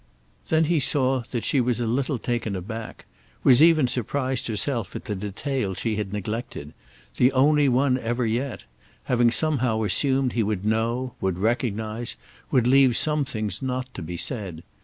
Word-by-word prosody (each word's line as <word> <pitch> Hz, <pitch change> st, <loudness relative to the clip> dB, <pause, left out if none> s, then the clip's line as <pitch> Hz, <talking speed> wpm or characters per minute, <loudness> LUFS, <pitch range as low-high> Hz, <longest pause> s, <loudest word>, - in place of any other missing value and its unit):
Then 160 Hz, 0 st, +3 dB
he 165 Hz, 0 st, +2 dB
saw 130 Hz, -2 st, +2 dB
that 120 Hz, -3 st, -3 dB
she 135 Hz, -, +2 dB
was 120 Hz, -1 st, 0 dB
a 120 Hz, -, -1 dB
little 130 Hz, +4 st, -1 dB
taken 120 Hz, -3 st, -2 dB
aback, 110 Hz, +5 st, -7 dB, 0.4 s
was 130 Hz, 0 st, +7 dB
even 160 Hz, -5 st, +5 dB
surprised 130 Hz, +2 st, -1 dB
herself 115 Hz, -2 st, -2 dB
at -, -, -6 dB
the 105 Hz, -, -3 dB
detail 105 Hz, +2 st, -3 dB
she 110 Hz, +2 st, -2 dB
had 105 Hz, -3 st, -3 dB
neglected—the 105 Hz, -, -3 dB
only 145 Hz, +2 st, +4 dB
one 130 Hz, +1 st, +2 dB
ever 120 Hz, +1 st, -1 dB
yet; 120 Hz, +4 st, -2 dB, 0.4 s
having 120 Hz, -1 st, +3 dB
somehow 125 Hz, -6 st, +2 dB
assumed 130 Hz, +5 st, +1 dB
he 115 Hz, -, +1 dB
would 105 Hz, -2 st, -2 dB
know, 115 Hz, +3 st, -1 dB
would 95 Hz, -2 st, -1 dB
recognise, 110 Hz, +1 st, -2 dB, 0.3 s
would 125 Hz, -4 st, +2 dB
leave 130 Hz, -1 st, +5 dB
some 150 Hz, -2 st, +2 dB
things 110 Hz, -4 st, -3 dB
not 130 Hz, -1 st, -3 dB
to -, -, -7 dB
be 85 Hz, +2 st, -6 dB
said. 95 Hz, -, -5 dB
120 Hz, 160 wpm, -24 LUFS, 110-130 Hz, 0.4 s, was